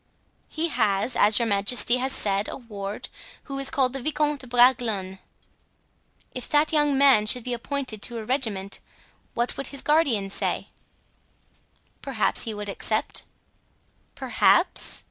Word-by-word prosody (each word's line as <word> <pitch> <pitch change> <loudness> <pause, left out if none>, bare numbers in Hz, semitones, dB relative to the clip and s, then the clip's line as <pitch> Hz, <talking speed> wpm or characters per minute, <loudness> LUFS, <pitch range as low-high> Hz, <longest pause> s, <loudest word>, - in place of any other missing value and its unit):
"He 330 +2 -2
has, 215 -2 0
as 210 +1 +4
your 235 - +2
majesty 225 +4 +3
has 260 +1 -1
said, 200 -2 0
a - - -6
ward, 205 -4 -7 0.4
who 275 -1 -6
is 275 - 0
called 260 -2 +1
the 270 - -5
Vicomte 295 0 0
de 255 - -10
Bragelonne." 235 -6 +2 1.1
"If 250 - -6
that 300 +2 +2
young 295 -2 +2
man 265 -7 +5
should 245 +2 +5
be 250 - -3
appointed 240 -2 -4
to 240 +2 -4
a 220 - -6
regiment 215 -6 -2 0.6
what 240 +1 -1
would 275 - -3
his 275 -1 -4
guardian 270 -11 +1
say?" - - -2 1.3
"Perhaps 260 -4 0
he 225 - -3
would 205 0 -6
accept." 215 +2 -2 0.9
"Perhaps?" - - +1
245 Hz, 145 wpm, -24 LUFS, 210-275 Hz, 1.3 s, man